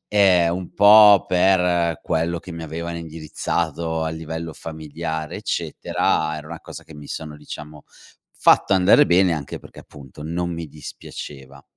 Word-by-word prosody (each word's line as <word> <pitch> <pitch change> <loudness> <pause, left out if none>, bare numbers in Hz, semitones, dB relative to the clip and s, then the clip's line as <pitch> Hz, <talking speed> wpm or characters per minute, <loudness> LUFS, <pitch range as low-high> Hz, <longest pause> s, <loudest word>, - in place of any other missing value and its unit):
Ehm, 90 -4 +4
un 90 -1 -7
po' 105 -1 +8
per 90 -3 +2
quello 85 +1 -1
che 90 - -10
mi 85 0 -7
avevano 85 +2 -5
indirizzato 80 0 -3
a 80 - -1
livello 80 0 -6
familiare 80 0 -6
eccetera, 80 0 -1
era 75 - -9
una 85 +1 -8
cosa - - -10
che 80 - -15
mi 75 -1 -11
sono, 75 -2 -7
diciamo, 75 0 -10 0.5
fatto - - +3
andare 95 +10 +5
bene, 90 0 +4
anche 75 -3 -5
perché, - - -14
appunto, 70 0 -14
non 85 +3 -3
mi 85 -1 -6
dispiaceva. 70 -2 -10
80 Hz, 150 wpm, -22 LUFS, 75-85 Hz, 0.5 s, po